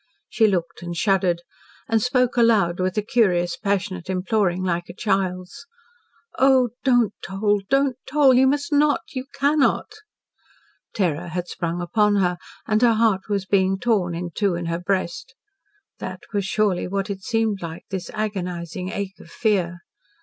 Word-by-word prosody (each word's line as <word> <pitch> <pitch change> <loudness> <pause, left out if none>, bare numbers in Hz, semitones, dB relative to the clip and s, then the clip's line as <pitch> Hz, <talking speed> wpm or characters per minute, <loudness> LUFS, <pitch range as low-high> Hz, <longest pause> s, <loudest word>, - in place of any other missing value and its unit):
She 220 - +3
looked 175 -4 -2
and 175 0 -5
shuddered, 185 -3 +1 0.4
and 225 -1 +2
spoke 250 +1 +1
aloud 215 -8 +3
with 185 +2 -1
a 210 - +1
curious, 180 -6 +2
passionate 195 -3 -2
imploring, 185 -1 0
like 175 -1 -2
a - - -9
child's. 195 +5 -2 0.7
"Oh, 260 -2 +5
don't 245 -5 +3
toll! 205 +1 0
Don't 275 -1 +2
toll! 275 -1 +5
You 260 +1 +5
must 290 +3 0
not! 295 +2 +3
You 255 -1 -4
cannot!" 285 +6 +1 1.0
Terror 175 -4 0
had 175 +1 -4
sprung 170 0 -3
upon 210 +3 +2
her, 180 -3 +1 0.3
and 215 0 +1
her 240 -2 +5
heart 215 -3 +1
was 200 -2 -1
being 190 0 +2
torn 195 -6 0
in 175 0 -4
two 200 0 0
in 170 0 -4
her 170 0 -2
breast. 185 +6 -2 0.6
That - - -6
was 200 -2 0
surely 200 -2 0
what 195 +1 -2
it 195 -1 -6
seemed 220 -1 0
like 165 -1 -7
this 190 -2 -4
agonising 180 -4 -4
ache 195 -2 -5
of - - -14
fear. 175 -5 0
195 Hz, 155 wpm, -23 LUFS, 180-225 Hz, 1.0 s, Oh